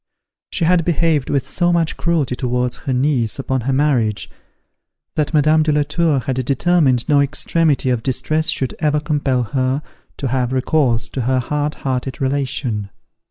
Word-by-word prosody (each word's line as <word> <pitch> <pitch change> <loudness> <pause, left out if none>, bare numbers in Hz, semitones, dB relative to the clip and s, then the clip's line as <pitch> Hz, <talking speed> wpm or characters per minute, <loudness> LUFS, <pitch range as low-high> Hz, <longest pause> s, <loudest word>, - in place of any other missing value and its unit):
She 170 - -1
had 175 0 +3
behaved 160 -4 +1
with 140 -3 0
so 175 -1 +1
much 170 -2 +1
cruelty 160 -7 0
towards 125 -1 -1
her 135 - -4
niece 125 -3 +1
upon 130 -1 -2
her 130 +4 -1
marriage, 130 -7 +1 0.8
that 150 -2 -1
Madame 155 +1 +4
de 155 0 +2
la 150 0 +2
Tour 155 -2 +1
had 130 +1 -2
determined 140 -2 +2
no 145 -2 +4
extremity 145 -1 +1
of 120 -2 0
distress 155 +5 -1
should 130 -3 -1
ever 150 -1 +1
compel 145 -4 0
her 130 +4 -1 0.3
to 135 - -2
have 130 0 0
recourse 130 -3 +1
to 130 - -3
her 130 +2 +1
hard 150 +4 -1
hearted 130 0 -2
relation. 130 -6 -2
140 Hz, 160 wpm, -19 LUFS, 125-155 Hz, 0.8 s, Madame